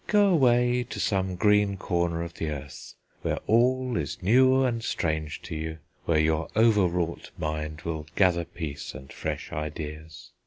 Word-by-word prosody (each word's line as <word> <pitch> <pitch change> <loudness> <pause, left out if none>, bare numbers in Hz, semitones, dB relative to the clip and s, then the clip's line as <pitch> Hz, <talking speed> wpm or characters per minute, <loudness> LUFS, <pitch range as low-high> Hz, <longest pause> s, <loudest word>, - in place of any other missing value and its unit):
Go 205 -1 +4
away 125 -6 +4
to - - -5
some 95 -3 0
green 105 +1 +3
corner 85 -2 -1
of 85 0 -7
the 80 - -3
earth, 70 -1 -8 0.3
where - - -1
all 125 +2 +2
is - - -4
new 130 +6 +5
and 115 -3 0
strange 80 -7 -2
to - - -6
you, 80 0 -4 0.3
where 85 - +2
your 80 +1 +2
over 110 -4 +5
wrought 85 -1 -3
mind 75 -1 -3
will 80 -2 -4
gather 90 -3 +3
peace 80 -6 -6
and 65 +1 -10
fresh - - -4
ideas. 75 +1 -6
85 Hz, 160 wpm, -27 LUFS, 80-115 Hz, 0.3 s, new